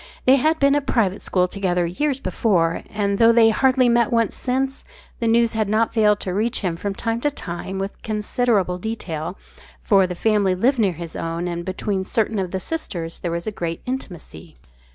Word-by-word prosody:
They 260 +2 +6
had 315 +4 +2
been 280 -2 +4
at 290 - +2
a - - -20
private 205 -7 +1
school 180 -1 +1
together 180 -2 -1
years 270 - -1
before, 180 -5 +1
and 200 -1 -1
though 230 0 +7
they 230 -1 +6
had 220 - -1
hardly 260 -1 +4
met 235 0 +3
once 230 -2 +1
since, 265 +1 -2 0.4
the 230 - 0
news 230 0 +3
had 215 -2 0
not 220 +2 +1
failed 210 -2 +3
to 185 - -3
reach 225 +5 0
him 180 -5 -1
from 195 +3 -4
time 230 +2 -2
to 295 - +2
time 190 -7 -6
with 195 +1 -5
considerable 210 -3 0
detail, 180 -5 -4 0.4
for 195 -3 +3
the 180 - -5
family 205 -1 +2
lived 245 +7 +2
near 200 -5 +2
his 170 0 -8
own 165 +1 -3
and 170 0 -3
between 190 +1 -2
certain 220 +1 -1
of 185 -2 -2
the 190 - -3
sisters 175 - -5
there 175 - -3
was 170 +2 -4
great 170 -3 -4
intimacy. 185 - -7
205 Hz, 200 wpm, -22 LUFS, 180-235 Hz, 0.4 s, though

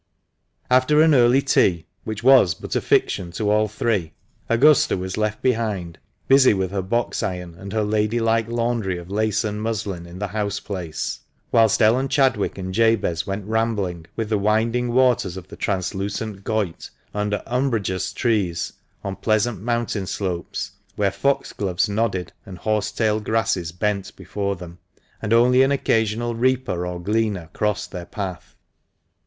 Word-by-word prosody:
After 130 +4 +4
an 160 -1 +5
early 125 +1 +5
tea, 85 -10 +2 0.2
which 110 0 -5
was 125 -10 +6
but - - -6
a - - +2
fiction 85 -2 +1
to 105 +1 0
all 110 0 +3
three, 105 -6 -1 0.4
Augusta 135 +3 +4
was 95 0 -4
left 110 0 -2
behind, 105 -9 -1 0.3
busy 135 -4 +6
with 95 -1 -1
her 100 -1 -1
box 115 +6 -1
iron 90 -5 -4
and 95 +3 -9
her 110 -1 0
lady 105 +2 +1
like 115 -1 +1
laundry 115 -5 -1
of 85 +2 -9
lace 110 +1 +1
and 105 -1 -3
muslin 100 -6 -3
in 85 +1 -10
the 100 +1 -3
house 100 0 -2
place, 90 -6 -4 0.3
whilst 115 -2 +4
Ellen 125 +5 +4
Chadwick 130 -8 +1
and 95 -1 -5
Jabez 110 -6 +2
went 100 0 -3
rambling 105 -7 -1
with 110 -2 -3
the 105 -2 +1
winding 115 +4 +1
waters 120 -7 +2
of 95 0 -10
the - - -9
translucent 100 +1 -3
Goyt, 105 -7 -2 0.2
under 105 0 -1
umbrageous 115 -7 -1
trees 95 -8 0 0.3
on 100 -1 -3
pleasant 110 -2 0
mountain 115 -4 -1
slopes, 90 -4 -3 0.2
where 100 -2 +1
foxgloves 100 -8 0
nodded 100 -3 -1
and 95 -4 -10
horsetail 110 +1 0
grasses 110 -5 0
bent 100 +2 -2
before 100 +1 -3
them, 90 -1 -11 0.4
and 105 - -3
only 125 +2 +5
an 135 +1 +4
occasional 115 -3 +1
reaper 120 -7 0
or 90 0 -4
gleaner 100 -3 -1
crossed 105 -1 -1
their 90 -2 -7
path. 95 -4 -6
105 Hz, 155 wpm, -22 LUFS, 95-115 Hz, 0.4 s, was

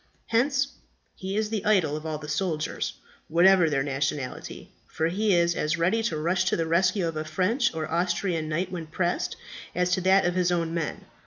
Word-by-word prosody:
Hence 270 +4 +2 0.5
he 190 +2 -4
is 215 0 -1
the 215 -3 -2
idol 185 -8 +2
of 155 +1 -5
all 155 -1 -2
the 150 0 -9
soldiers, 155 0 -2 0.3
whatever 175 +1 +5
their 135 -2 +1
nationality; 135 -1 -4 0.2
for 160 +1 -1
he 200 +2 +2
is 170 0 +3
as 155 +1 -1
ready 180 +7 +2
to 225 -9 -1
rush 175 +4 +1
to 190 - +2
the 165 - 0
rescue 180 +2 +2
of 165 - -4
a 155 - -2
French 225 - +1
or 155 -1 -2
Austrian 170 -1 -1
knight 170 +4 -1
when 170 -3 -5
pressed 175 +2 -1 0.4
as 180 0 +1
to 185 - +2
that 190 +1 +4
of 175 - +1
his 180 -1 +1
own 165 -2 0
men. 165 -3 -3
175 Hz, 195 wpm, -26 LUFS, 160-190 Hz, 0.5 s, whatever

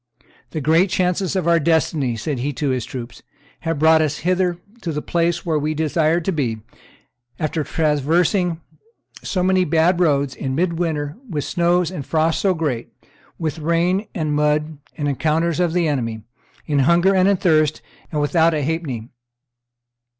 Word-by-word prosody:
"The 155 - -4
great 165 +6 +3
chances 180 +1 0
of 185 -3 0
our 170 0 +4
destiny," 150 -6 +1
said 130 +4 -3
he 140 +4 -2
to 135 +2 -1
his 125 -3 -2
troops, 120 -2 -8 0.4
"have 165 -2 -2
brought 160 +2 +5
us 150 -1 0
hither 180 -1 +1 0.2
to 170 - -3
the 150 - -2
place 170 0 0
where 160 -3 +1
we 155 +1 -2
desired 160 +2 +1
to - - +1
be, 130 -9 -1 0.8
after 155 -1 -1
traversing 165 +4 +1 0.6
so 185 -2 -2
many 185 0 +3
bad 170 +2 +2
roads, 140 -5 +2
in 130 0 -4
midwinter, 165 -3 -1
with 150 -5 -2
snows 175 0 +1
and 175 -7 -5
frosts 160 +3 +1
so 190 -2 +2
great, 140 -8 -3 0.5
with 160 -1 -3
rain, 170 +6 +1
and 155 -5 -1
mud, 150 0 0 0.2
and 145 -2 -1
encounters 155 +4 0
of 175 -2 +2
the 170 -1 +1
enemy, 115 -7 -2 0.4
in 145 -2 +1
hunger 170 +7 +4
and 190 0 +3
thirst, 155 -5 +2 0.3
and 150 - -1
without 160 +2 +3
a 150 - -1
halfpenny. 135 -7 -3
160 Hz, 160 wpm, -20 LUFS, 145-175 Hz, 0.8 s, brought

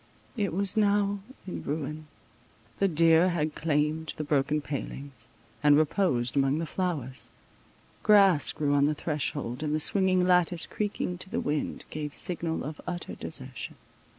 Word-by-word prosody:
It 205 -5 -1
was 195 +3 +1
now 205 -1 +2 0.3
in 185 - -5
ruin: 155 +1 -4 0.7
the 195 - +4
deer 165 +1 +5
had 155 -3 -1
climbed 155 +1 -1
the 155 - -2
broken 145 0 +1
palings, 140 -4 -5 0.3
and 145 0 +6
reposed 150 -6 +1
among 135 +1 +2
the 165 - -2
flowers; 150 -8 -3 0.7
grass 195 -7 +5
grew 145 -1 0
on 140 0 +4
the 150 - 0
threshold, 145 -5 -3
and 150 -1 0
the - - 0
swinging 185 +2 +4
lattice 180 -2 +3
creaking 200 -4 -3
to 190 - -5
the - - -2
wind, 150 0 -2
gave 150 -2 -4
signal 170 -2 -2
of 150 +1 -6
utter 175 -1 -4
desertion. 130 -4 -5
155 Hz, 150 wpm, -28 LUFS, 145-180 Hz, 0.7 s, and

